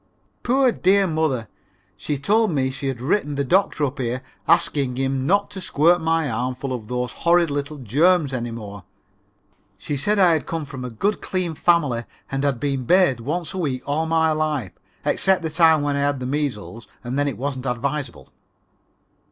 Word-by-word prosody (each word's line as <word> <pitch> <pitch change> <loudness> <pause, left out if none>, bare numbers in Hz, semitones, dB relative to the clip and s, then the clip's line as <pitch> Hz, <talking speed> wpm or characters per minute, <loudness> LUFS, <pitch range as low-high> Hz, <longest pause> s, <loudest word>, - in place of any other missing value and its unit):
Poor, 260 +1 +3
dear 195 -1 +3
mother, 155 - -1 0.5
she 140 +10 -3
told 215 +10 +2
me 135 -5 0
she 135 +1 -5
had 130 -3 -3
written 145 +2 0
the 140 - 0
doctor 175 -2 +2
up 140 +1 -5
here 125 +1 -2 0.2
asking 150 -7 +2
him 135 0 -1
not 200 +2 +2
to 190 - -7
squirt 170 +2 +3
my 160 -1 +1
arm 125 +1 -2
full 130 +1 -4
of 115 -4 -6
those 125 0 -2
horrid 170 -2 +2
little 145 +1 -3
germs 145 - +2
any 120 -1 -3
more. 105 -4 -8 0.9
She 145 - -4
said 205 +10 +1
I 175 -5 +5
came 165 0 -5
from 135 -3 -8
a 125 - -4
good, 200 - -1
clean 185 -3 -2
family, 145 -8 +1 0.3
and 135 0 -2
had 140 -4 0
been 135 -2 -2
bathed 180 -6 +4
once 160 - -3
a 190 - -4
week 135 -6 -2
all 155 +3 -1
my 160 0 +2
life, 155 - -1 0.3
except 190 -2 +2
the 160 - -2
time 160 -2 +4
when 145 -1 0
I - - 0
had 140 -1 0
the 125 - -5
measles 125 -6 -3 0.2
and 125 +3 -3
then 145 - +1
it 140 - -3
wasn't 135 0 -3
advisable. 135 +2 -3
145 Hz, 185 wpm, -22 LUFS, 130-165 Hz, 0.9 s, I